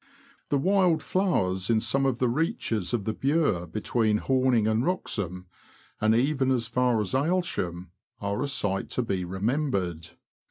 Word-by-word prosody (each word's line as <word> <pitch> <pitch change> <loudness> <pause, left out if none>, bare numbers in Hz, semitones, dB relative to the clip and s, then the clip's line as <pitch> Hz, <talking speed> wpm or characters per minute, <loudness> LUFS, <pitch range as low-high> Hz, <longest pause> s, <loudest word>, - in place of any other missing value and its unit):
The 145 - +2
wild 180 0 +2
flowers 95 - 0
in 115 -1 +4
some 135 +5 +1
of 130 -3 0
the 125 - +1
reaches 120 - -1
of 120 -4 -1
the 110 - -2
Bure 135 - +1
between 110 +4 0
Horning 130 -2 +2
and 110 +2 +1
Wroxham, 95 - -2 0.5
and 110 +1 +3
even 135 +2 +1
as 125 -3 +2
far 120 0 +1
as 105 - -3
Aylsham, 130 - -1 0.3
are 100 0 -2
a 145 - 0
sight 100 -8 -1
to 125 - +2
be 95 -5 -2
remembered. 95 - -2
115 Hz, 155 wpm, -27 LUFS, 100-140 Hz, 0.5 s, in